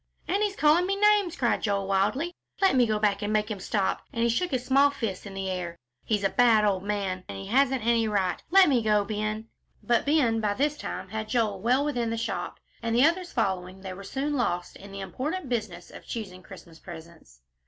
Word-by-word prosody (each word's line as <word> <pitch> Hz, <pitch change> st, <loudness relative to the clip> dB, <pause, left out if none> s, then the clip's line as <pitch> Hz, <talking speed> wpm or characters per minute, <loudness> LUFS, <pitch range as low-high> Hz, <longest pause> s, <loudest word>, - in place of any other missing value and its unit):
"And 395 Hz, +3 st, 0 dB
he's 410 Hz, -2 st, 0 dB
calling 315 Hz, +3 st, +4 dB
me 395 Hz, -, 0 dB
names," 415 Hz, -3 st, +3 dB
cried 240 Hz, -3 st, 0 dB
Joel, 200 Hz, -2 st, 0 dB
wildly; 210 Hz, -, 0 dB, 0.3 s
"let 385 Hz, -7 st, +4 dB
me 245 Hz, -2 st, +4 dB
go 215 Hz, -1 st, +1 dB
back 205 Hz, -1 st, +1 dB
and 205 Hz, 0 st, -2 dB
make 215 Hz, +1 st, 0 dB
him 205 Hz, -, -4 dB
stop," 195 Hz, 0 st, -1 dB
and 230 Hz, -4 st, -1 dB
he 235 Hz, -, +3 dB
shook 350 Hz, +10 st, 0 dB
his 255 Hz, -3 st, -2 dB
small 275 Hz, +2 st, +5 dB
fists 220 Hz, -8 st, -4 dB
in 195 Hz, -, -9 dB
the 195 Hz, 0 st, -3 dB
air. 180 Hz, -2 st, -4 dB, 0.3 s
"He's 210 Hz, -2 st, -1 dB
a 195 Hz, -, +3 dB
bad 225 Hz, -1 st, +4 dB
old 195 Hz, -3 st, +1 dB
man 195 Hz, -2 st, -2 dB
and -, -, -6 dB
he 195 Hz, -, -7 dB
hasn't 260 Hz, +2 st, +2 dB
any 230 Hz, -1 st, +3 dB
right. 195 Hz, -4 st, 0 dB
Let 385 Hz, +1 st, +7 dB
me 260 Hz, -5 st, +3 dB
go, 210 Hz, -2 st, +2 dB
Ben." 215 Hz, +1 st, -3 dB, 0.3 s
But 240 Hz, +2 st, +1 dB
Ben 265 Hz, -7 st, +3 dB
by 205 Hz, -1 st, 0 dB
this 290 Hz, +4 st, +1 dB
time 185 Hz, -9 st, -6 dB
had 215 Hz, +1 st, -5 dB
Joel 215 Hz, -6 st, 0 dB
well 255 Hz, +6 st, +2 dB
within 245 Hz, -6 st, -1 dB
the 230 Hz, -, -2 dB
shop, 230 Hz, +1 st, -4 dB, 0.2 s
and, 230 Hz, 0 st, -1 dB
the 250 Hz, +4 st, +6 dB
others 350 Hz, +2 st, 0 dB
following, 190 Hz, -4 st, -2 dB
they 190 Hz, -1 st, -6 dB
were 200 Hz, +2 st, -10 dB
soon 275 Hz, +8 st, -3 dB
lost 180 Hz, -10 st, -1 dB
in 200 Hz, +1 st, -12 dB
the 195 Hz, 0 st, -7 dB
important 285 Hz, -, -4 dB
business 210 Hz, -8 st, -4 dB
of -, -, -12 dB
choosing 190 Hz, -5 st, -6 dB
Christmas 170 Hz, -3 st, -13 dB
presents. 165 Hz, -, -13 dB
220 Hz, 225 wpm, -27 LUFS, 195-265 Hz, 0.3 s, Let